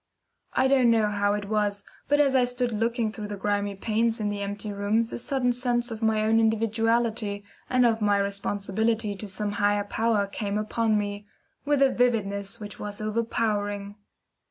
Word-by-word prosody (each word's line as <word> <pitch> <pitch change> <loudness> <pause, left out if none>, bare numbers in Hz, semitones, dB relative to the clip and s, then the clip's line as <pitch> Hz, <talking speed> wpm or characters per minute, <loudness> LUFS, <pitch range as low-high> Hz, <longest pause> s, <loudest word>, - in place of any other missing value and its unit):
I - - +3
don't 260 -3 +4
know 220 -2 +3
how 205 0 +1
it 205 -1 -4
was, 205 -1 0 0.2
but 290 0 +3
as 280 -2 +4
I 255 - +5
stood 245 0 -1
looking 230 +1 0
through 210 -1 -6
the 205 0 -5
grimy 205 0 -1
panes 225 +3 0
in 210 -1 -1
the 205 0 -3
empty 205 +1 -4
rooms 215 +3 0
a - - -3
sudden 250 -1 0
sense 240 -1 0
of 220 0 -6
my 220 -1 +2
own 220 +1 +3
individuality 225 -1 +1 0.3
and 255 -1 +4
of 225 -1 +2
my 205 -1 +3
responsibility 200 +2 -1
to 210 +2 -5
some 205 +2 -2
higher 205 0 +2
power 215 0 +1
came 200 0 -3
upon 215 +1 +1
me, 205 0 -4 0.4
with 290 -1 +3
a 270 - +4
vividness 210 -4 0
which 205 -1 -8
was 205 -1 -6
overpowering. 210 -2 -1
215 Hz, 180 wpm, -26 LUFS, 205-230 Hz, 0.4 s, I